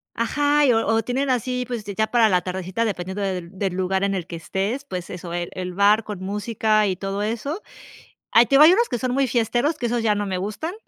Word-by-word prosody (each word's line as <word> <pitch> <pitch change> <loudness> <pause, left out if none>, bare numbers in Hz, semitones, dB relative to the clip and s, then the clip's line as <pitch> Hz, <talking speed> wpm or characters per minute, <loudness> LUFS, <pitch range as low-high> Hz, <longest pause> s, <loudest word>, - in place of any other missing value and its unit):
Ajá, 290 +5 +2
y, 255 - +5
o 225 -1 +1
o 225 +1 +2
tienen 265 +2 -1
así, 250 +1 -1
pues, 235 -4 -5
ya 210 +2 -1
para 230 -2 +3
la 180 -2 +2
tardecita 185 +4 -3
dependiendo 190 -1 -3
del 185 -1 -4
del 195 -2 -1
lugar 190 +1 0
en 195 0 0
el 180 -3 -3
que 170 - -7
estés, 200 - -3
pues 180 -8 -6
eso, 175 -1 -7
el 175 0 -3
el 180 -1 -5
bar 205 +3 +3
con 205 -4 -7
música 210 +2 0
y 185 -2 -1
todo 195 +1 -3
eso. 235 - -3 0.7
Ah, 230 - +7
te - - -19
digo, 290 - +8
hay 330 +4 +8
unos 470 +4 +2
que 245 - -1
son 250 +1 -2
muy 270 0 +1
fiesteros, 240 +6 0
que 245 - -3
esos 240 0 0
ya 215 -2 +2
no 205 - -2
me 190 -2 -2
gustan, 215 - -4
215 Hz, 245 wpm, -22 LUFS, 190-245 Hz, 0.7 s, digo